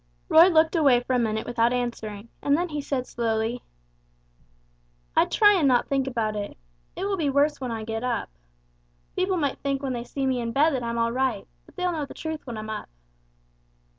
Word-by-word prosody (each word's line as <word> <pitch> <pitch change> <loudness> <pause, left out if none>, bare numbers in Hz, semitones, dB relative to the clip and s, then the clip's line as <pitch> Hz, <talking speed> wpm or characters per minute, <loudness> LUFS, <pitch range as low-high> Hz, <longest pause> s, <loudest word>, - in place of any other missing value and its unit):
Roy 330 +3 +8
looked 320 -1 +3
away 275 -7 +4
for 250 +1 -2
a 250 - +3
minute 220 -1 -1
without 235 0 +1
answering, 235 -3 -4
and 285 +1 +3
then 350 +1 -1
he 300 -1 -3
said 270 -3 -2
slowly: 230 0 -1 1.5
"I - - +5
try 415 -1 +5
and 340 -8 +3
not 245 -2 +3
think 270 -1 +1
about 225 -4 -1
it. 205 -1 -5 0.4
It - - -3
will 400 -1 -1
be 305 -5 0
worse 285 +1 +2
when 255 -2 -3
I 225 -1 -4
get 225 +1 -4
up 245 - -2 0.8
people 370 0 +1
might 285 -5 -1
think 275 0 -2
when 265 -2 -1
they 240 -1 -4
see 270 +2 -3
me 260 -2 0
in 230 -1 -3
bed 300 +5 +4
that 260 -4 -1
I'm 235 0 -3
all 230 0 +1
right, 250 -4 -1 0.2
but - - -19
they'll 360 -1 0
know 310 -4 -2
the - - -11
truth 315 -3 -5
when 235 -2 -5
I'm 215 0 -5
up." 215 - -6
255 Hz, 210 wpm, -25 LUFS, 230-300 Hz, 1.5 s, Roy